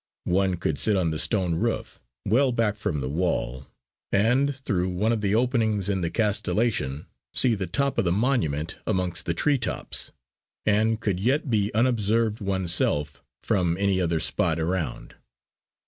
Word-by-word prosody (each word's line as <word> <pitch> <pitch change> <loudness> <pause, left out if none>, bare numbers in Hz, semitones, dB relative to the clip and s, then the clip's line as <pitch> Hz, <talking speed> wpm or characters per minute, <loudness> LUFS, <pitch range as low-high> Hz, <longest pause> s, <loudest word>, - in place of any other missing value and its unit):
One 95 -1 +2
could 80 -4 -2
sit 105 - +3
on 85 -3 +1
the 80 - -2
stone 95 -6 +1
roof, 80 - -2 0.2
well 130 +5 +3
back 115 -3 +1
from 80 -9 -2
the 65 - -3
wall, 70 -5 -2 0.4
and 125 +7 +2
through 95 -4 0
one 100 +5 0
of 115 -2 0
the 100 0 +1
openings 110 -5 +1
in 95 -2 0
the 85 - -1
castellation 105 - 0 0.3
see 125 -3 +4
the 95 -3 -3
top 140 0 0
of - - +1
the 85 - +2
monument 90 - 0
amongst 90 -3 -1
the - - 0
tree 145 -2 +3
tops; 115 - -4 0.5
and 110 +1 +2
could 100 -5 -1
yet 135 +6 0
be 105 -2 +1
unobserved 115 -2 +1
oneself 85 -6 0 0.2
from 90 -6 +1
any 100 -1 +1
other 85 -2 0
spot 80 0 0
around. 85 0 -3
100 Hz, 160 wpm, -25 LUFS, 85-115 Hz, 0.5 s, see